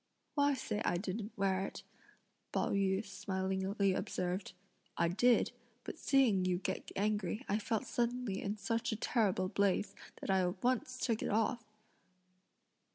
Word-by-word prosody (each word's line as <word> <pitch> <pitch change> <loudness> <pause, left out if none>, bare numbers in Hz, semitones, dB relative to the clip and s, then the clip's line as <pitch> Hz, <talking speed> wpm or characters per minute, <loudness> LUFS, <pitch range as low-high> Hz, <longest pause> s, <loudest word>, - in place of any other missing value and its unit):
"Why 285 -1 +3
say 215 -4 -3
I 175 - +1
didn't 205 +4 -4
wear 195 -1 +1
it?" - - -6 0.7
Pao - - +1
yü 195 +1 +1
smilingly 190 0 0
observed. 185 +1 -2 0.4
"I 170 - +3
did, 235 +6 +4 0.3
but - - -7
seeing 255 -9 +4
you 180 -1 +1
get 190 +1 -4
angry 210 +3 0
I 205 - +1
felt 220 0 -1
suddenly 240 -4 -1
in 205 +2 -2
such 230 +2 -1
a - - 0
terrible 210 -5 +1
blaze, 200 +1 +1 0.3
that - - -2
I 190 - +4
at 180 0 -2
once 255 +1 +1
took 230 -3 0
it - - -1
off!" 225 +3 +1
200 Hz, 150 wpm, -35 LUFS, 190-230 Hz, 0.7 s, did